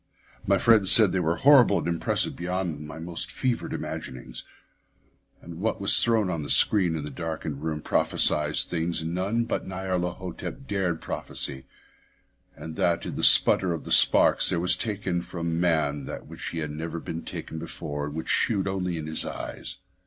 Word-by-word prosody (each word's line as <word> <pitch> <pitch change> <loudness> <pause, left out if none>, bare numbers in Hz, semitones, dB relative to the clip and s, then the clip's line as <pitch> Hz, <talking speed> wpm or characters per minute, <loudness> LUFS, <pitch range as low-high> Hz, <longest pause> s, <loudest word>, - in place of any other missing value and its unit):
My 100 0 +4
friend 110 -3 +4
said 110 -5 +9
they 95 - 0
were 85 -1 0
horrible 130 -6 +5
and - - -3
impressive 85 -1 -1
beyond 90 -4 -4
my 80 - -9
most 85 +1 -5
fevered 125 -3 -2
imaginings; 65 -1 -6 1.0
that 85 - -10
what 100 +7 -3
was 100 +1 +3
thrown 115 -4 +2
on 80 -4 -3
a 70 - -7
screen 90 -6 +3
in 80 - -4
the 75 - -7
darkened 80 -2 -5
room 80 -1 -4
prophesied 75 0 +2
things 85 -1 0
none 95 +8 -1
but 115 - -3
Nyarlathotep 90 +5 -4
dared 90 -5 -2
prophesy, 65 -2 -4 0.9
and 80 -1 -9
that 85 -1 0
in - - -5
the - - -4
sputter 90 -2 +5
of 80 - -6
his - - +5
sparks - - +5
there 85 - 0
was 90 +1 +3
taken 100 -5 -2
from 85 -1 -4
men 80 -5 0
that - - -7
which - - -7
had 80 -3 -4
never 80 +2 -5
been 80 0 -6
taken 80 - -7
before 75 -3 -6
yet 75 - -8
which 80 - -5
shewed 100 -4 +1
only 90 -3 -2
in 80 - -5
the 80 0 -1
eyes. - - -7
85 Hz, 175 wpm, -26 LUFS, 80-95 Hz, 1.0 s, said